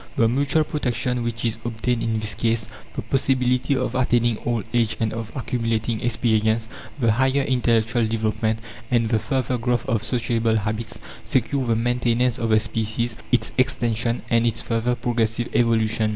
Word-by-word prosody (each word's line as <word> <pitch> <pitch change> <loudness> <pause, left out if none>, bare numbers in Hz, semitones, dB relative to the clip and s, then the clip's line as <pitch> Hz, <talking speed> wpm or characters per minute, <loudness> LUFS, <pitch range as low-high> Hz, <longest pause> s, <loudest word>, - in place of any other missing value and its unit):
The 115 -4 +4
mutual 140 +6 +2
protection 125 -4 -1
which 115 0 -3
is 115 -1 -1
obtained 120 +1 -1
in 110 -1 0
this 105 -1 0
case, 115 -2 0 0.3
the - - -3
possibility 130 0 +1
of 125 - -1
attaining 120 -3 +2
old 120 -3 0
age 115 -2 +1
and 110 -1 0
of 115 -1 -5
accumulating 115 -3 -1
experience, 110 -1 +1 0.3
the 115 -5 +3
higher 130 +4 +2
intellectual 120 -3 +2
development, 110 0 0 0.3
and 115 -2 +2
the 110 - +2
further 125 +2 -1
growth 120 0 0
of 110 -2 +1
sociable 115 -2 0
habits, 110 +2 -3 0.3
secure 130 +1 0
the 115 - +2
maintenance 120 +1 +1
of 115 - -1
the 110 0 +5
species, 110 +1 -2 0.2
its 125 - +2
extension, 120 -2 0
and 115 0 +3
its 115 -1 -1
further 115 +1 0
progressive 120 -1 -1
evolution. 115 -2 +2
115 Hz, 160 wpm, -23 LUFS, 110-125 Hz, 0.3 s, the